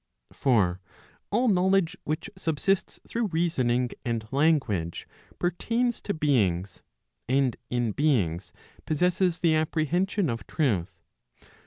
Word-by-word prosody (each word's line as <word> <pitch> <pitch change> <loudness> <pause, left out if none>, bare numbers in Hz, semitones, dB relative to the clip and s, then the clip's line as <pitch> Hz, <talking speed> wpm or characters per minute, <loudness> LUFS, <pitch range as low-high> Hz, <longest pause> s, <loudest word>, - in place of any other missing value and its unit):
For 95 -9 +2 0.5
all 240 +5 +2
knowledge 190 -2 +3
which 155 +1 -2
subsists 185 +2 -1
through 230 -1 -1
reasoning 130 -9 +1
and 115 -2 -2
language, 130 - +1 0.3
per¬ 175 - +1
tains 235 +6 -1
to 205 - -2
beings, 100 - +1 0.5
and 130 -1 +2
in 120 -2 0
beings 100 - 0 0.4
possesses 180 +2 +1
the 165 -2 +4
apprehension 165 +5 +1
of 115 -3 -4
truth. 95 - -1
150 Hz, 110 wpm, -27 LUFS, 115-180 Hz, 0.5 s, the